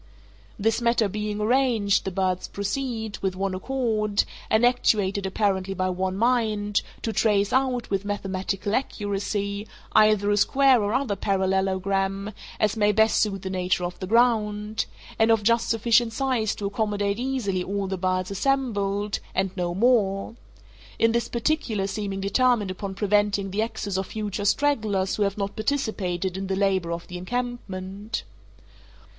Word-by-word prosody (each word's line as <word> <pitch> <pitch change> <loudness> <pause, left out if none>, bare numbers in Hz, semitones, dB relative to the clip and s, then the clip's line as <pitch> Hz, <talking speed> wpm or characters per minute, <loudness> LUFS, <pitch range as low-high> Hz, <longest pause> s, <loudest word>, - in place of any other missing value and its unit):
This 225 +3 +1
matter 235 -2 +3
being 210 +1 -3
arranged, 220 -3 +2
the - - 0
birds 185 0 -1
proceed, 220 0 -3
with 190 -1 -1
one 195 0 -1
accord, 215 -1 0 0.3
and 220 +2 +4
actuated 205 -5 +2
apparently 195 -1 0
by 185 0 0
one 185 +1 -2
mind, 215 -3 +1 0.2
to 225 - -1
trace 205 -3 +2
out, 255 -3 +1
with 195 0 0
mathematical 195 0 -3
accuracy, 205 -3 -2 0.2
either 215 -1 +4
a 205 - +2
square 265 +2 +4
or 205 +2 0
other 260 -7 0
parallelogram, 195 +1 0 0.3
as 215 0 +2
may 210 -1 +3
best 220 +2 +3
suit 195 -3 -1
the 190 - -3
nature 180 -1 0
of 175 0 -4
the 185 - -4
ground, 215 -2 +2 0.3
and 225 0 +4
of 225 -2 +3
just 230 +2 +2
sufficient 230 0 +3
size 250 -4 0
to 205 - -5
accommodate 205 0 -1
easily 240 -8 -1
all 200 +1 -2
the 190 0 -2
birds 185 0 -1
assembled, 205 -4 0 0.2
and 190 0 0
no 175 -2 -2
more—in 225 +1 0
this 235 0 0
particular 235 -5 0
seeming 195 0 -3
determined 210 0 +2
upon 190 +1 -5
preventing 205 -1 +1
the 205 +3 0
access 205 -4 -3
of 190 - -3
future 210 -2 -4
stragglers 210 -6 +1
who - - -3
have 200 0 +1
not 200 -1 -3
participated 195 -7 -1
in 195 0 -4
the 190 - -1
labor 190 -3 +1
of 170 0 -4
the 180 0 -6
encampment. 210 -2 -4
205 Hz, 150 wpm, -25 LUFS, 195-225 Hz, 0.3 s, and